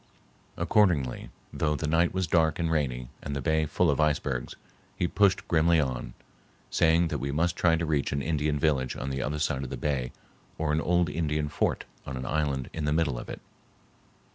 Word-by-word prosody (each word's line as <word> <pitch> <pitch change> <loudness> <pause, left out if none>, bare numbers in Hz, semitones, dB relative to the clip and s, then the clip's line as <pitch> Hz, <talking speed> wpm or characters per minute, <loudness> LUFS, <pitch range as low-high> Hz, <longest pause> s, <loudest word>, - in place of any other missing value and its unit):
Accordingly, 85 - +2 0.2
though 75 -1 0
the 80 - -3
night 80 +3 +2
was 95 0 0
dark 80 -2 +2
and 85 -1 -1
rainy 65 -6 -1
and 70 0 -4
the - - -1
bay 80 +3 +1
full 80 +1 +2
of 70 - -1
icebergs, 75 -5 0 0.4
he 90 - +1
pushed 100 +1 +2
grimly 80 0 +4
on, 65 -4 -2 0.6
saying 85 +1 +3
that - - -2
we 70 - -2
must 85 +4 +1
try 85 -2 +3
to 85 0 -1
reach 75 -3 0
an 70 - 0
Indian 75 -1 0
village 70 -4 +1
on 70 - -4
the 65 0 -2
other 75 +3 -2
side 70 -2 -1
of 65 - -5
the - - -5
bay 65 -5 -1 0.5
or 75 -1 0
an 80 - +1
old 85 0 +2
Indian 75 0 -1
fort - - 0 0.2
on 65 -1 -4
an 65 - -5
island 70 -3 -1
in 80 -2 -3
the 75 - +1
middle 75 -6 +1
of - - -9
it. - - -7
75 Hz, 200 wpm, -28 LUFS, 70-80 Hz, 0.6 s, grimly